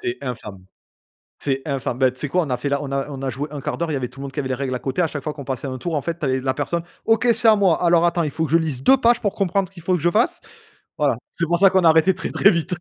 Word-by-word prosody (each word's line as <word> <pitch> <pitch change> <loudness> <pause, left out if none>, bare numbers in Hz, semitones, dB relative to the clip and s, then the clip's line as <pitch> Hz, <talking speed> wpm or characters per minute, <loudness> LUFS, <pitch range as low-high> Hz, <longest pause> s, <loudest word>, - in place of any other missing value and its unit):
C'est 120 +1 -3
infâme 105 -7 -7 0.8
c'est 135 -1 -1
infâme. 130 -2 -3
Ben, 130 -1 +4
tu 130 - -14
sais 145 - -3
quoi? 180 +3 +2
On 150 - -4
a 125 - 0
fait 140 - -4
la 140 0 0
on 140 -1 -6
a 140 0 -1
on 135 -1 -7
a 135 - -2
joué 140 +4 -4
1/4. 155 +3 -3
Il - - -2
y - - 0
avait 125 - -3
tout 135 - -15
le - - -6
monde 135 - -6
qui 145 - -5
avait 135 - -2
les 130 - 0
règles 130 -1 -3
à 125 - -2
côté, 140 +7 -1
à - - +2
chaque 145 -2 -6
fois 150 - -3
qu'on 140 -3 -9
passait 135 +1 -4
un 130 -1 -5
tour, 165 +7 -4
en 145 - 0
fait, 170 +2 -4
tu - - -2
avais 130 -1 +1
la 130 0 0
personne: 165 +4 -2 0.2
«OK 225 +2 +2
c'est 230 +1 +1
à 215 - +7
moi. 190 -4 +2
Alors 170 0 +4
attends, 170 0 0
il 150 - -2
faut 160 +3 -1
que 150 - -6
je 165 - +6
lise 155 -6 -2
2 270 - +6
pages 235 -1 +3
pour 205 -3 -1
comprendre 195 -1 0
ce - - -23
qu'il 170 - -11
faut 185 - +1
que 165 - -3
je 175 - +3
fasse». 225 +7 +1 0.6
Voilà, - - +2 0.2
c'est 170 - -1
pour 170 +1 +1
ça 195 0 +6
qu'on 190 -2 +2
a - - +7
arrêté 160 +4 +4
très, 185 - -4
très 200 - +5
vite. 170 0 -1
155 Hz, 345 wpm, -21 LUFS, 135-175 Hz, 0.8 s, à